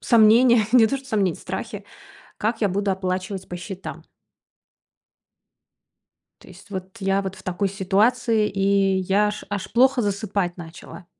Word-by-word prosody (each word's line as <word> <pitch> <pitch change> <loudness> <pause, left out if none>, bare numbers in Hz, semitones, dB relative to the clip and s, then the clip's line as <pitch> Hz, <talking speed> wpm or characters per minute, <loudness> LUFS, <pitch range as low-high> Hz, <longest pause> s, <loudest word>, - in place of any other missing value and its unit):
сомнения, 235 0 +5
не 240 -3 +7
то 275 - -1
что 270 0 -12
сомнения, 200 -7 0
страхи: - - -6 0.5
как 225 +2 -2
я 205 - +2
буду 200 +2 -1
оплачивать 185 0 -3
по 180 - -6
счетам. 185 +1 -8 2.4
То - - -17
есть 205 - -16
вот 190 +1 -7
я 195 0 +1
вот 190 -1 -5
в - - -15
такой 185 +2 -1
ситуации, 210 +3 +1
и 195 0 +2
я 195 +3 +2
аж 210 0 -5
аж 205 -2 -4
плохо 255 +1 +4
засыпать 200 -3 -2
начала. 170 +1 -11
200 Hz, 145 wpm, -23 LUFS, 190-220 Hz, 2.4 s, не